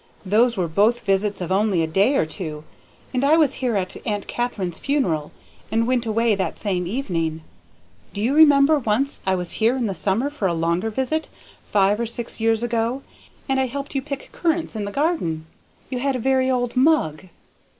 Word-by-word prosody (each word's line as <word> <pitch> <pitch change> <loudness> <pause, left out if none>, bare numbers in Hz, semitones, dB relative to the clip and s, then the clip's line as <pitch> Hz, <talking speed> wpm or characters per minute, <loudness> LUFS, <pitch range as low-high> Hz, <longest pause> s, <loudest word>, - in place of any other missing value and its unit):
"Those 225 +4 +3
were 180 -2 0
both 210 +9 +2
visits 200 -1 0
of 180 0 -4
only 195 -3 +2
a - - -1
day 200 - +2
or - - +2
two, 155 -2 -6 0.5
and 255 +1 0
I 300 +3 +5
was 300 -5 +3
here 245 -4 0
at 185 -2 -2
Aunt 205 -2 -2
Katharine's 200 -8 -3
funeral, 175 - 0 0.4
and 225 +1 +2
went 245 -1 0
away 225 +1 +2
that 195 -2 -2
same 180 -4 -2
evening. 165 - -2 0.7
Do - - -7
you 235 +6 +1
remember 295 -1 +6
once 255 +4 -1
I 190 - +3
was 180 -2 -2
here 235 +4 +3
in 245 - -1
the 200 - -1
summer 210 +10 0
for 220 -10 -1
a 170 - 0
longer 170 +5 0
visit, 265 +7 -2 0.4
five 205 +1 +2
or 235 - -1
six 235 +1 -6
years 225 0 +2
ago, 235 +3 -1 0.4
and 270 -1 +1
I 260 - +1
helped 280 +4 -6
you 270 - 0
pick 280 -1 -7
currants 330 -5 -1
in 210 -2 -3
the 200 - -5
garden? 240 - -1 0.5
You 250 - -2
had 275 +1 0
a - - -2
very 260 +1 +2
old 245 -1 0
mug." 255 - +2
225 Hz, 195 wpm, -22 LUFS, 190-265 Hz, 0.7 s, remember